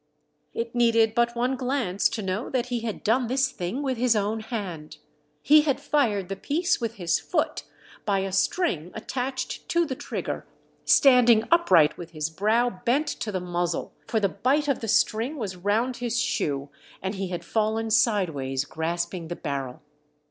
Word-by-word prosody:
It 230 0 -3
needed 230 -2 +3
but 235 0 +1
one 250 +3 0
glance 250 -7 0
to 220 - -4
know 190 +5 -2
that 250 -2 -1
he 245 -1 -1
had 225 -2 -5
done 240 +3 +2
this 260 +1 +1
thing 210 +10 -4
with 260 -3 -1
his 245 -2 +3
own 210 +2 0
hand. 195 -9 -6 0.5
He 300 +1 +7
had 285 -3 0
fired 250 -10 +1
the 195 - -4
piece 335 - 0
with 230 -1 -2
his 175 -5 0
foot - - -1 0.4
by 195 -2 +1
a 195 0 -3
string 185 - 0
attached 260 +3 -4
to 340 0 +2
the 280 - -3
trigger, - - -5 0.4
standing 245 -5 +6
upright 180 - +4
with 170 -1 -9
his 155 0 -3
brow 215 +3 +1
bent 275 +6 +1
to 215 - -4
the 190 - -2
muzzle, 175 -1 -2
for 225 - +1
the 200 - +2
bight 270 - 0
of 275 - +1
the 225 - -5
string 225 +6 +1
was 205 -7 -4
round 215 +7 0
his 240 -1 -1
shoe, 140 - -1 0.3
and 190 +1 -2
he 195 -1 -3
had 175 -1 -5
fallen 220 +2 0
sideways, 155 - +1
grasping 170 +2 -3
the 175 - -4
barrel. 140 -2 -5
220 Hz, 175 wpm, -26 LUFS, 180-250 Hz, 0.5 s, He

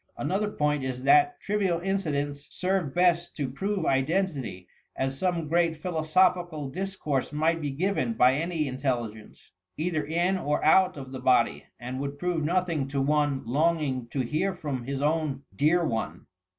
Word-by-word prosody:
Another 205 +3 -1
point 150 -6 0
is 130 -1 -4
that 360 - +4
trivial 195 -5 0
incidents 150 -7 -2
serve 185 -5 -1
best 175 -1 +2
to 145 -3 -1
prove 195 +5 -2
identity, 135 - -1 0.3
as 135 0 -1
some 170 0 -1
great 165 0 +2
philosophical 175 -2 +1
discourse 185 -6 -2
might 160 +2 +1
be 145 - -2
given 195 +10 0
by 125 - +5
any 160 +1 -1
intelligence, 120 -5 -4 0.3
either 160 0 -1
in 175 +4 0
or 150 -2 -1
out 185 +2 +5
of 130 -2 -8
the 130 - -6
body, 130 -1 +2
and 125 +2 -5
would 140 +1 -4
prove 175 -1 -1
nothing 170 -3 0
to 140 0 -2
one 145 0 +1
longing 145 -2 0
to 130 +3 -2
hear 155 +10 -1
from 140 -8 -4
his 140 +1 -3
own 150 -3 0
dear 165 - +3
one. 110 - -3
155 Hz, 155 wpm, -27 LUFS, 135-180 Hz, 0.3 s, by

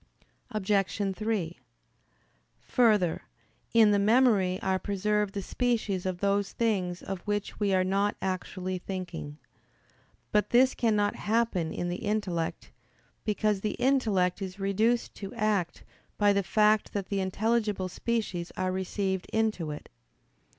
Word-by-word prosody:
Obj. 195 -2 0
3: 210 -6 -2 1.0
Further, 210 -9 +2 0.5
in 225 -2 +6
the 205 - +3
memory 205 -4 +3
are 190 0 +1
preserved 205 +1 -1
the 200 - -2
species 220 -7 -1
of 180 -1 -3
those 200 0 +1
things 190 -6 -1
of 195 -2 -5
which 205 0 -2
we 205 -2 +1
are 185 - +3
not 200 +2 +1
actually 185 0 -3
thinking. 175 -6 -6 0.9
But 210 0 +2
this 255 +2 +5
cannot 210 -3 +1
happen 210 -7 0
in 175 - -3
the 175 - -2
intellect, 205 -6 -2 0.5
because 210 -2 +1
the 210 - -2
intellect 215 -9 +2
is 190 +1 -6
reduced 215 +5 +1
to 195 -2 -7
act 205 -5 0 0.3
by 205 -1 +4
the 200 - +2
fact 210 +2 +2
that 200 -2 -3
the 200 - 0
intelligible 210 0 0
species 190 -3 -2
are 185 0 0
received 190 0 -2
into 215 -7 0
it. 150 0 -7
200 Hz, 130 wpm, -29 LUFS, 185-215 Hz, 1.0 s, in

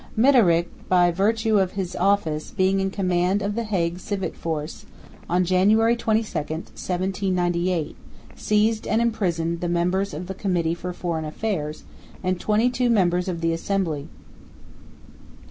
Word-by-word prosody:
Midderigh, 220 -10 +5 0.2
by 175 -1 +4
virtue 215 +4 +2
of 190 -1 0
his 185 -2 -4
office, 165 -7 +1
being 190 0 +1
in 195 0 0
command 185 0 0
of 205 +1 -1
the 230 +2 -2
Hague 175 -4 -1
civic 195 0 -3
force, 155 -1 -5 0.4
on 180 +1 +2
January 210 +6 +4
22, 225 -1 +1 0.2
1798, 175 +1 -2 0.4
seized 215 +1 +1
and 220 - +2
imprisoned 175 -8 0
the 175 - -1
members 180 +1 0
of 170 +4 -5
the 190 - -5
Committee 180 -4 0
for 180 +1 -5
Foreign 170 -2 -3
Affairs 155 -2 -3 0.4
and 185 -1 0
twenty 215 +5 +2
two 250 -1 +1
members 180 -5 +2
of 170 -3 -3
the 165 0 +1
Assembly. 165 -4 -2
185 Hz, 140 wpm, -23 LUFS, 170-205 Hz, 0.4 s, Midderigh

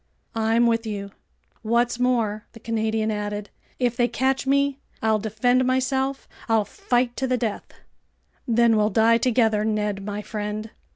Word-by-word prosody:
"I'm 225 +1 +2
with 230 -1 +1
you." 200 -2 -5 0.5
"What's 235 +2 +1
more," 230 -4 0
the 230 - -12
Canadian 220 -1 -1
added, 210 0 -4 0.3
"if 245 -2 0
they 240 -1 +2
catch 265 +2 0
me, 280 0 +2 0.2
I'll 220 -1 +2
defend 225 +4 +1
myself, 265 +1 0 0.2
I'll 220 -2 +3
fight 240 +3 -1
to 265 - -1
the 255 0 +1
death." 225 -4 -3 0.8
"Then 235 -1 +4
we'll 210 0 +3
die 225 +2 +4
together, 225 -4 +2
Ned 210 -2 -1
my 205 +1 -4
friend." 210 +1 -4
225 Hz, 150 wpm, -24 LUFS, 215-245 Hz, 0.8 s, Then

